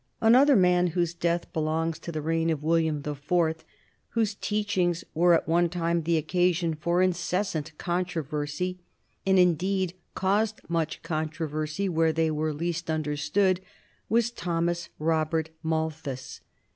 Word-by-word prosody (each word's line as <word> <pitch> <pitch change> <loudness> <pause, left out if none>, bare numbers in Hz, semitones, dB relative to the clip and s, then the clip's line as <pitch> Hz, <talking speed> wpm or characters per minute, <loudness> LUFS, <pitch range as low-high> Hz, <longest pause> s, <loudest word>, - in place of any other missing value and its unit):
Another 260 +5 +6
man 180 -2 +4
whose 170 -1 +1
death 170 0 -1
belongs 160 +1 -1
to 170 - -6
the 155 -2 -4
reign 165 +1 +1
of 155 -3 -1
William 160 -2 +1
the 150 - -3
Fourth, 160 +3 0 0.5
whose 220 -2 +2
teachings 205 -5 0
were 175 +2 +5
at - - -1
one 170 +1 +3
time 170 -1 0
the 165 +1 +1
occasion 175 +1 +1
for 170 +4 +1
incessant 175 -3 -1
controversy 175 0 -2 0.5
and 190 0 +5
indeed 185 +1 +2 0.2
caused 210 +3 +1
most 165 -2 -2
controversy 155 +2 -2
where 165 -2 +2
they 160 0 +1
were 155 +1 -1
least 170 +2 -3
understood 155 +5 +1 0.5
was 235 +1 +2
Thomas 170 -4 -2
Robert 160 0 0
Malthus. 160 -5 -3
165 Hz, 135 wpm, -27 LUFS, 155-180 Hz, 0.5 s, Another